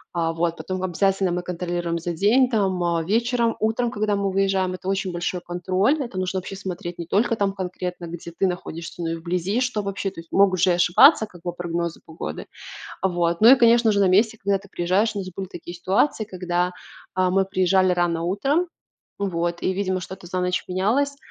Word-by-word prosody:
А 165 -1 +1
вот. 170 0 -1
Потом 185 0 -4
обязательно 190 +1 +1
мы 180 0 -1
контролируем 175 -1 -3
за 170 +1 -3
день, 220 +9 +4
там, 195 -6 0
а, 170 -1 +1
вечером, 235 +4 +1
утром, 225 +3 0
когда 210 -3 0
мы 200 -1 0
выезжаем. 190 -1 +1
Это 185 +1 -10
очень 195 -1 -1
большой 175 +1 -3
контроль, 185 - 0
это 210 -6 -5
нужно 185 +1 -2
вообще 190 +1 -5
смотреть 175 -2 -6
не 170 - -5
только 225 +5 +2
там 200 -2 0
конкретно, 180 -2 -5
где 170 0 -8
ты 180 - -1
находишься, 175 -2 -5
но 165 - -2
и 165 - -2
вблизи, 180 +6 -1
что 245 -4 0
вообще. 195 -1 -3
То - - -11
есть 165 0 -13
могут 190 -2 +4
же 185 - +4
и 175 - +4
ошибаться 220 - +6
как 175 -5 -16
бы 175 - -3
прогнозы 170 -1 -3
погоды. 120 - -6 0.6
Вот, 175 -2 +1
ну 225 +3 +8
и 270 - +10
конечно 235 -2 +5
же 200 - +1
на 195 - +4
месте, 215 +4 +3
когда 200 0 +2
ты 200 +1 -16
приезжаешь, 185 +6 +1
у - - -2
нас 185 -1 -5
были 190 +2 -6
такие 175 -1 -9
ситуации, 195 +7 +1
когда, 180 -3 -2 0.4
а, 185 0 +2
мы 195 +1 +2
приезжали 185 -1 +2
рано 170 -2 0
утром, 275 - +1 0.5
вот, 175 -3 -2
и 190 - +1
видимо 185 -1 -1
что-то 185 +1 -9
за 185 +1 -2
ночь 180 0 -1
менялось, 240 +10 +1
185 Hz, 205 wpm, -23 LUFS, 175-200 Hz, 0.6 s, и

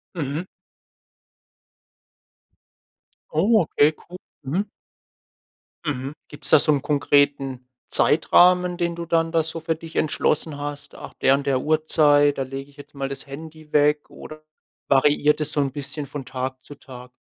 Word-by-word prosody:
Mhm. 155 +2 -3 2.9
Oh, 220 - +3
okay 150 -1 +3
cool. 180 - -12 0.3
Mhm. 180 +10 -1 1.2
Mhm. 135 -2 -3
Gibt's 145 - -7
da - - +7
so 155 - +2
'n 145 -2 +1
konkreten 140 -3 +1 0.2
Zeitrahmen, 180 +3 +4
den 170 -1 -1
du 170 0 -6
dann 165 -1 +1
da 165 -1 +2
so 160 +1 -6
für 165 0 -2
dich 165 0 -12
entschlossen 155 0 0
hast? 145 0 -7
Nach - - -10
der 135 - +3
und 140 0 -4
der 130 -2 +1
Uhrzeit, 150 -2 +3
da 135 - -1
lege 135 +1 -7
ich 145 - -23
jetzt 145 - -14
mal 135 -1 -3
das 135 -1 -7
Handy 155 +2 -11
weg 150 0 +2
oder 155 0 -11 0.5
variiert 145 +2 +3
das 150 0 -2
so 150 - -1
'n 135 -1 -1
bisschen 145 +1 -6
von 140 0 -7
Tag 130 0 -5
zu 145 - -11
Tag? 125 -3 -12
145 Hz, 155 wpm, -23 LUFS, 140-160 Hz, 2.9 s, da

